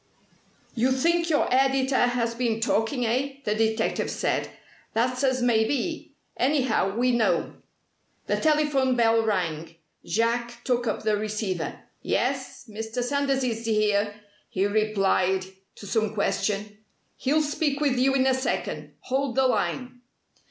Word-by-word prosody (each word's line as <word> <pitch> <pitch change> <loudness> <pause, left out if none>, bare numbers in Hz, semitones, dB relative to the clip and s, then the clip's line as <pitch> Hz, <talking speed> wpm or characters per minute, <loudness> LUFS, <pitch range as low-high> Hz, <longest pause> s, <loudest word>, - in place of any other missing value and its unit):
"You 250 +2 +1
think 335 +6 +2
your 300 -2 +2
editor 265 0 +2
has 235 -1 -1
been 230 -2 -1
talking, 225 +3 0
eh?" 260 +5 0
the 210 - 0
detective 220 +1 0
said. - - -1 0.4
"That's 250 +3 0
as 260 -2 +1
may 230 -3 +4
be. 290 +7 -3 0.2
Anyhow, 250 -7 +1
we 250 +1 +3
know." 235 -2 +1 0.7
The - - 0
telephone 295 -4 +2
bell 230 -1 +3
rang. 165 -6 -2 0.3
Jack 235 +2 -1
took 245 -2 0
up 215 - -2
the 215 -1 +2
receiver. 210 -5 -3 0.2
"Yes, - - -2
Mr. 225 +3 -4
Sanders 275 +1 0
is 230 -2 -2
here," 210 -2 +1 0.3
he 190 +1 0
replied 195 -3 +1 0.3
to - - -11
some 215 0 -1
question. 210 0 -1 0.4
"He'll 305 +4 +2
speak 290 -1 -1
with 275 -4 +1
you 270 +1 +3
in 260 -1 +3
a 265 - +4
second. 260 +1 -3
Hold 265 -1 -1
the 265 - +3
line." 250 -1 -1
240 Hz, 140 wpm, -26 LUFS, 215-265 Hz, 0.7 s, may